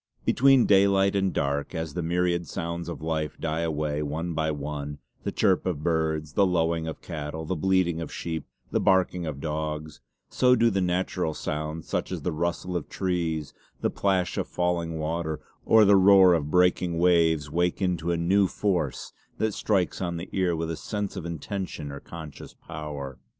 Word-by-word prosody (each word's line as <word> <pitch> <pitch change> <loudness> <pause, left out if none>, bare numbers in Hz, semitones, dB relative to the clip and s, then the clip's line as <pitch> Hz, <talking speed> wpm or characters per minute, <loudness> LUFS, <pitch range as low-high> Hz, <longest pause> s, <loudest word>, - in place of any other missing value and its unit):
Between 135 -1 +5
daylight 100 0 +4
and 95 -1 +2
dark 70 +4 -1
as 80 -3 -3
the 90 - -2
myriad 85 0 0
sounds 85 +3 -4
of 85 - -6
life 80 -2 -2
die 80 0 -1
away 75 -2 -1
one 80 +4 -3
by 80 0 0
one, 75 -1 -4 0.3
the - - 0
chirp 95 -2 +2
of 80 -5 -2
birds, 80 -2 0
the 100 - +4
lowing 85 -3 +1
of 80 - -6
cattle, 80 -1 -5
the - - -2
bleating 85 0 +1
of 80 - -6
sheep, 80 -2 -4 0.2
the - - +2
barking 90 -3 +2
of 70 -3 -4
dogs, 75 0 -4 0.3
so 125 0 +4
do 115 -1 +3
the 95 -1 0
natural 90 -2 -1
sounds 75 +1 -4
such - - -2
as - - -4
the - - 0
rustle 85 +3 -2
of 85 - -3
trees, 85 -5 -2 0.3
the - - +1
plash 95 -3 0
of - - -2
falling 85 -2 -1
water, 80 0 -2 0.3
or 110 -1 +7
the 100 0 +6
roar 95 -1 +7
of 75 -3 0
breaking 90 0 +2
waves 80 -4 +3
wake 90 +2 +1
into 90 -3 -1
a 85 - +1
new 95 +4 +3
force 90 -8 -2 0.2
that 110 -1 0
strikes 95 -3 0
on 85 -2 -2
the 85 +3 -7
ear 90 -3 +1
with 80 0 -2
a - - -2
sense 105 -2 -4
of 85 - -5
intention 85 -2 -5
or 70 - -7
conscious 80 -2 -10
power. 70 -4 -7
85 Hz, 180 wpm, -26 LUFS, 80-90 Hz, 0.3 s, or